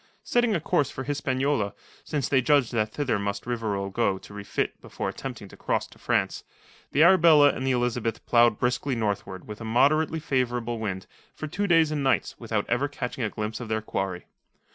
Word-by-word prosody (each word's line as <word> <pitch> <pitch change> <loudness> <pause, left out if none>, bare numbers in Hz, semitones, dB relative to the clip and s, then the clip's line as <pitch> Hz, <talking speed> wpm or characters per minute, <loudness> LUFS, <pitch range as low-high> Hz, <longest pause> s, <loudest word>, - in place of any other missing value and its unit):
Setting 240 -3 +2
a - - +1
course 145 -2 +1
for 130 - -6
Hispaniola, 135 -6 -1 0.3
since 145 -4 -2
they 135 -2 +3
judged 140 -2 +3
that 110 -2 0
thither 135 -6 -1
must 100 0 -3
Rivarol 105 -5 -2
go 100 -2 +1
to 100 - -13
refit 100 -1 -3
before - - -4
attempting - - -7
to - - -13
cross - - -1
to - - -18
France, - - 0 0.5
the 150 - +4
Arabella 165 -5 +7
and 130 -1 -3
the - - +3
Elizabeth 120 -2 -1
ploughed 120 -2 +4
briskly 125 +2 0
northward 100 -4 -3
with 105 +1 -8
a - - -5
moderately 155 +8 +2
favourable 120 -5 -1
wind 95 -4 -3 0.3
for - - -5
two 200 +7 -2
days 165 -3 +4
and 150 -2 -1
nights 135 - +1
without 110 -3 -2
ever 125 +4 +1
catching 130 -3 -4
a 110 - 0
glimpse 110 +1 -4
of 120 - -6
their 110 0 0
quarry. 95 -4 -3
125 Hz, 190 wpm, -26 LUFS, 110-145 Hz, 0.5 s, Arabella